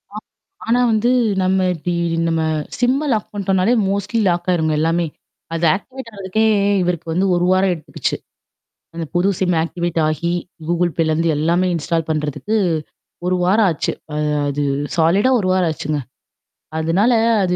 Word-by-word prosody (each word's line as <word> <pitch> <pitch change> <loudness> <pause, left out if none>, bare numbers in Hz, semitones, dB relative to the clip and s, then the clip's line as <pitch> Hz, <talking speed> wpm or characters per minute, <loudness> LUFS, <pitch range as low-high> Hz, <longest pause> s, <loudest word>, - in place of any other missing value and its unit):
ஆ - - -4 0.5
ஆனா 240 +2 +3
வந்து 225 +3 +2 0.3
நம்ம 185 0 +2
இப்டி 175 +2 -3 0.4
நம்ம 165 -1 0 0.4
சிம்ம 260 +4 +1
லாக் 215 -2 -1
பண்ணிட்டோனாலே 195 +2 +1
மோஸ்ட்லி 200 +3 -1
லாக் 175 +1 -1
ஆயிருங்க 160 -3 +1
எல்லாமே. 165 +1 +1 0.5
அது 165 +1 -1
ஆக்டிவேட் 255 +3 -8
ஆறதுக்கே 200 +3 0 0.4
இவருக்கு 175 -2 -2
வந்து 185 +4 +1
1 175 0 +1
வாரம் 185 0 +3
எடுத்துக்குச்சு. 155 - -3 0.8
அந்த 165 -1 -4
புது 180 +3 +2
சிம்ம 180 -2 +2
ஆக்டிவேட் 170 -1 -3
ஆகி 165 +2 -1 0.4
Google 175 0 +1
Payலருந்து 165 0 +1
எல்லாமே 170 +4 +1
இன்ஸ்டால் 165 0 -1
பண்றதுக்கு 155 +8 -1 0.7
1 180 0 +2
வாரம் 205 +3 +4
ஆச்சு. 155 - -2 0.2
அ - - -2 0.3
அது 145 +1 -2 0.3
சாலிடா 185 +10 +3
1 185 - -1
வாரம் 180 -3 +2
ஆச்சுங்க. 150 0 -3 0.8
அதனால 185 +10 +2 0.3
அது 180 -1 +1
180 Hz, 145 wpm, -19 LUFS, 165-200 Hz, 0.8 s, வாரம்